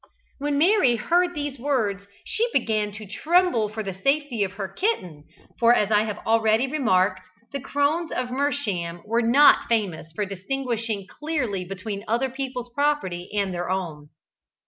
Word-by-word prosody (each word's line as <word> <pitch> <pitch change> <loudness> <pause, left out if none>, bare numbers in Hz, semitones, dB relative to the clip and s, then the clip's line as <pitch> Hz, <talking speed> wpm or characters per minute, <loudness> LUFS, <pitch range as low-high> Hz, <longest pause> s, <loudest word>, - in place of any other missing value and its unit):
When 285 0 -1
Mary 325 - +4
heard 350 +9 +1
these 290 -3 -4
words 215 -7 -1 0.2
she 470 +2 0
begin 215 - 0
to 215 +1 -8
tremble 300 - +2
for 215 +1 -5
the 195 -2 -4
safety 275 +2 0
of 190 -1 -3
her 200 -1 -4
kitten, 185 - -2 0.3
for 235 0 +6
as 210 -2 +1
I 210 0 +4
have 210 -1 -4
already 225 +1 +3
remarked, 190 -10 +1 0.3
the 280 - -4
Crones 290 +5 0
of 250 -1 -2
Mersham 210 -12 -1
were 230 +2 +1
not 255 +6 +6
famous 190 -8 -1
for 210 +4 -1
distinguishing 220 +1 -3
clearly 250 - -3
between 195 +2 -5
other 240 +4 0
people's 255 -2 -5
property 285 -12 -1
and 200 -3 -1
their 175 0 -3
own. 165 -6 -3
225 Hz, 155 wpm, -24 LUFS, 195-280 Hz, 0.3 s, for